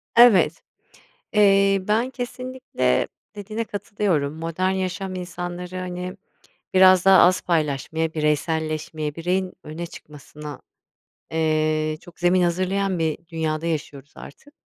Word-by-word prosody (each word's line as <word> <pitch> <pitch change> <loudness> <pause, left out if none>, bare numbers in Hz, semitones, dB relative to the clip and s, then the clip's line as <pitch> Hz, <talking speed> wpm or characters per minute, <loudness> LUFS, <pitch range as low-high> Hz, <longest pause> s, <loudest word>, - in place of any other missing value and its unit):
Evet, 200 -10 +6 0.7
eee, 195 -1 +5
ben 225 +4 +2
kesinlikle 255 - -2 0.3
dediğine 215 +2 -4
katılıyorum. 200 -8 -1
Modern 165 +3 -1
yaşam 190 0 -3
insanları, 180 0 -6
hani, 180 +1 -5 0.6
biraz 185 -1 +6
daha 195 -1 +8
az 185 +1 +5
paylaşmaya, 160 0 -1
bireyselleşmeye, 155 0 -1
bireyin 180 +2 -1
öne 155 +3 -6
çıkmasına, 150 -2 -11 0.7
eee, 155 -1 +1
çok 175 - -16
zemin 180 +1 +3
hazırlayan 185 +2 0
bir 160 -2 0
dünyada 160 -1 -2
yaşıyoruz 145 -3 -4
artık. 290 - -13
175 Hz, 105 wpm, -23 LUFS, 155-190 Hz, 0.7 s, daha